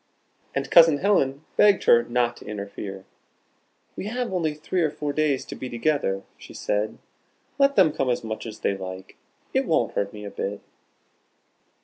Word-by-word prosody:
And 140 Hz, 0 st, -2 dB
Cousin 165 Hz, -3 st, +8 dB
Helen 145 Hz, -6 st, +1 dB
begged 205 Hz, -2 st, +5 dB
her 120 Hz, -, +6 dB
not 120 Hz, 0 st, 0 dB
to -, -, -13 dB
interfere. 100 Hz, -2 st, -6 dB, 0.9 s
"We 195 Hz, -, -5 dB
have 245 Hz, -1 st, -3 dB
only 160 Hz, -4 st, 0 dB
three 160 Hz, +4 st, -2 dB
or 160 Hz, -, +2 dB
four 145 Hz, -1 st, -4 dB
days 150 Hz, -3 st, +1 dB
to -, -, -8 dB
be 130 Hz, -, -6 dB
together," 120 Hz, -7 st, 0 dB, 0.2 s
she -, -, -12 dB
said. 105 Hz, +1 st, -1 dB, 0.6 s
"Let 275 Hz, 0 st, +4 dB
them 180 Hz, -7 st, +5 dB
come 135 Hz, -4 st, -1 dB
as 120 Hz, -, 0 dB
much 110 Hz, +1 st, -5 dB
as 110 Hz, -, -9 dB
they 100 Hz, -, +1 dB
like. 95 Hz, 0 st, -8 dB, 0.4 s
It -, -, +1 dB
won't -, -, +1 dB
hurt 100 Hz, 0 st, -1 dB
me 105 Hz, -1 st, -9 dB
a 100 Hz, -, -6 dB
bit." 100 Hz, +1 st, -4 dB
135 Hz, 170 wpm, -25 LUFS, 105-160 Hz, 0.9 s, Cousin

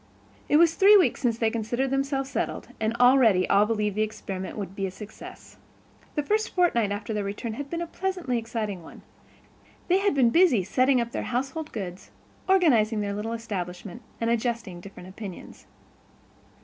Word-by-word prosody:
It 295 Hz, -, +5 dB
was 330 Hz, 0 st, +5 dB
three 405 Hz, +4 st, +7 dB
weeks 330 Hz, -11 st, +2 dB
since 235 Hz, -3 st, +1 dB
they 230 Hz, -, 0 dB
had 220 Hz, -, +1 dB
considered 240 Hz, +4 st, -1 dB
themselves 270 Hz, 0 st, -1 dB
settled, -, -, -3 dB
and 220 Hz, +1 st, -1 dB
already 245 Hz, -6 st, +5 dB
all 200 Hz, +1 st, +4 dB
believed 210 Hz, -2 st, -1 dB
the 215 Hz, -, 0 dB
experiment 195 Hz, -3 st, -4 dB
would 195 Hz, -2 st, -6 dB
be 195 Hz, -1 st, -2 dB
a -, -, -4 dB
success. 205 Hz, +3 st, -11 dB, 0.6 s
The 295 Hz, -, 0 dB
first 430 Hz, +7 st, -1 dB
fortnight 235 Hz, -, +2 dB
after 205 Hz, +2 st, -4 dB
their 210 Hz, -1 st, -1 dB
return 205 Hz, +3 st, -4 dB
had 280 Hz, +4 st, -6 dB
been 340 Hz, 0 st, -3 dB
a -, -, -4 dB
pleasantly 345 Hz, -8 st, -2 dB
exciting 220 Hz, -5 st, -4 dB
one; 160 Hz, -, -13 dB, 0.9 s
they 370 Hz, +2 st, +4 dB
had 400 Hz, -6 st, +1 dB
been 250 Hz, -4 st, +4 dB
busy 310 Hz, -, +4 dB
setting 255 Hz, +6 st, +2 dB
up 235 Hz, 0 st, -2 dB
their -, -, -3 dB
household 270 Hz, +5 st, -3 dB
goods, 185 Hz, -4 st, -7 dB, 0.4 s
organizing 235 Hz, -, +4 dB
their 200 Hz, -1 st, -2 dB
little 215 Hz, +3 st, -3 dB
establishment, 195 Hz, -3 st, -6 dB, 0.2 s
and 230 Hz, 0 st, 0 dB
adjusting 230 Hz, -6 st, -2 dB
different 190 Hz, -1 st, -11 dB
opinions. 190 Hz, -1 st, -10 dB
230 Hz, 175 wpm, -26 LUFS, 205-275 Hz, 0.9 s, three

